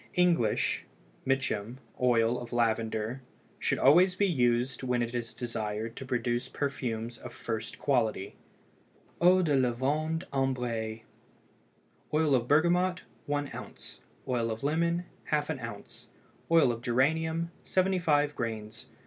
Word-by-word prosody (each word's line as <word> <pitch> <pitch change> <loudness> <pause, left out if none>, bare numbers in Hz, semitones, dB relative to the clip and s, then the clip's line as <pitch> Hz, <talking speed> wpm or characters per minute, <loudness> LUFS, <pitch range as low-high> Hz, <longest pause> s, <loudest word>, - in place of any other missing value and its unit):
English 170 - +2 0.4
(Mitcham) 130 -3 0 0.2
oil 120 -1 +3
of 120 - -8
lavender 115 0 0 0.4
should - - +1
always 180 +7 +5
be 200 - +2
used 125 -6 +1
when 125 -2 0
it 120 0 -4
is 120 -1 -3
desired 115 -2 -4
to 135 - -7
produce 120 0 -1
perfumes 120 -5 -3
of 125 - -8
first 110 -2 -5
quality. 115 -8 0 0.9
EAU 180 +1 +6
DE 150 -4 +2
LAVANDE 140 +6 0
AMBRÉE. 120 -5 -1 1.1
Oil 155 -2 +3
of 120 -2 +2
bergamot 175 +5 +3 0.2
1 145 -1 -1
oz. - - -9 0.3
Oil 120 -3 0
of 110 +3 -4
lemon 170 +4 +1 0.2
½ 150 -2 0
oz. 105 -3 -8 0.4
Oil 165 -6 +5
of 115 -1 -5
geranium 160 +7 +1
75 165 -6 +2
grains. 110 -1 -5
130 Hz, 120 wpm, -30 LUFS, 115-155 Hz, 1.1 s, EAU